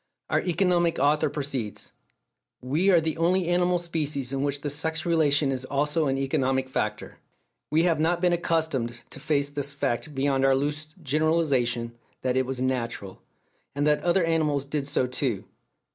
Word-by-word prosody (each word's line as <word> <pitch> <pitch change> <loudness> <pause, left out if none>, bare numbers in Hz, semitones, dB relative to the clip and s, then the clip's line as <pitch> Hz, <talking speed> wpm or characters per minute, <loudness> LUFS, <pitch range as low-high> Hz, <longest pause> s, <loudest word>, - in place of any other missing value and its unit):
Our - - +3
economic 175 -1 +1
author 145 +2 +2
proceeds: 135 -7 -4 0.7
"We 150 +10 +1
are 180 -3 +6
the 160 0 -2
only 175 +2 +2
animal 175 0 +2
species 150 -6 -3
in 135 - -1
which 140 0 -1
the 145 - -2
sex 160 +2 -1
relation 150 -4 +3
is 130 -1 -2
also 150 +3 0
an 135 0 0
economic 135 -1 0
factor... 105 -4 -3 0.5
We 155 +2 +3
have 165 -3 +2
not 165 +2 +2
been 175 0 +2
accustomed 160 -9 -1
to - - -8
face 145 -1 0
this 145 -1 -3
fact 140 +1 -2
beyond 135 0 +1
our 135 0 +5
loose 145 +3 -2 0.2
generalization 140 -6 +1 0.3
that 130 -1 0
it 130 -1 +1
was 130 -1 -2
'natural,' 115 -7 -3 0.5
and 145 +1 0
that 150 0 +3
other 175 +1 +2
animals 155 -4 +1
did 140 0 -3
so 145 -3 +1
too." 125 -5 -2
145 Hz, 165 wpm, -26 LUFS, 135-160 Hz, 0.7 s, are